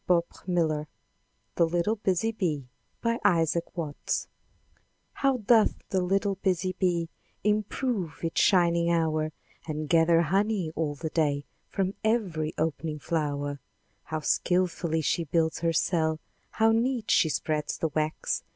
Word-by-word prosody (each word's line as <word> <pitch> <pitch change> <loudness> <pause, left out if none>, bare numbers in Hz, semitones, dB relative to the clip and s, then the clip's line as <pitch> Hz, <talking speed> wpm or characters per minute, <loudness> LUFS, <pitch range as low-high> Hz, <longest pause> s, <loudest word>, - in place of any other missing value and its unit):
— - - -28
Abridged 170 -3 0 0.7
THE 170 - +5
LITTLE 175 +7 0
BUSY 200 +2 +1
BEE 160 - -2 0.6
Isaac 170 0 +1
Watts 155 -4 -2 0.9
How 275 -2 +1
doth 225 -1 +4
the 190 - +1
little 195 +2 +1
busy 185 -1 0
bee 170 -3 +1 0.3
Improve 210 - -1
each 165 - 0
shining 170 -4 +4
hour, 155 -2 +1 0.4
And 155 -1 -3
gather 165 +1 +4
honey 195 0 +1
all 150 -2 -2
the 155 +2 -5
day 145 -3 +1 0.2
From 195 0 -1
every 190 -9 0
opening 160 0 -2
flow'r! 145 -2 -2 0.5
How 155 0 -3
skilfully 175 0 +1
she 170 +2 0
builds 160 +1 +1
her 165 0 +1
cell! 160 -1 +1 0.3
How 225 0 +4
neat 235 0 +1
she 160 - +4
spreads 150 0 -1
the 160 - -1
wax! 155 +1 -1
170 Hz, 130 wpm, -28 LUFS, 155-190 Hz, 0.9 s, THE